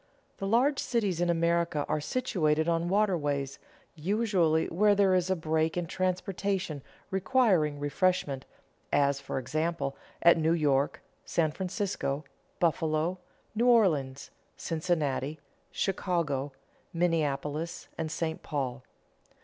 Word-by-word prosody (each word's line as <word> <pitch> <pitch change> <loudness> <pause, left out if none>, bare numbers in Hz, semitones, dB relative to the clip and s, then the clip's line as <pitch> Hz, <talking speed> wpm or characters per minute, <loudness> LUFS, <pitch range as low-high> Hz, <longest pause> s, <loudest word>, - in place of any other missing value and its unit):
The 195 - -3
large 260 +7 +3
cities 200 -8 0
in 175 - +2
America 170 -2 +1
are 150 - 0
situated 160 -7 0
on 170 0 +1
waterways, 145 -9 0 0.3
usually 175 -2 +1
where 205 +4 +4
there 195 -2 +4
is 180 0 +2
a 190 - +3
break 160 0 0
in 175 - 0
transportation 185 -2 -2 0.3
requiring 190 - +2
reshipment, 145 -2 0 0.5
as, 140 -1 +3
for - - -5
example, 155 +3 -2 0.3
at 170 -1 +7
New 160 +1 +3
York, 145 -4 +1 0.2
San 160 -2 +1
Francisco, 180 -5 -3 0.3
Buffalo, 165 +1 +1 0.3
New 235 +3 +1
Orleans, 155 - +2 0.3
Cincinnati, 155 -3 -1 0.3
Chicago, 165 -8 -1 0.4
Minneapolis, 160 -2 -1
and 160 -1 -3
St. 160 -1 -3
Paul. 135 -4 -3
165 Hz, 110 wpm, -29 LUFS, 150-185 Hz, 0.5 s, at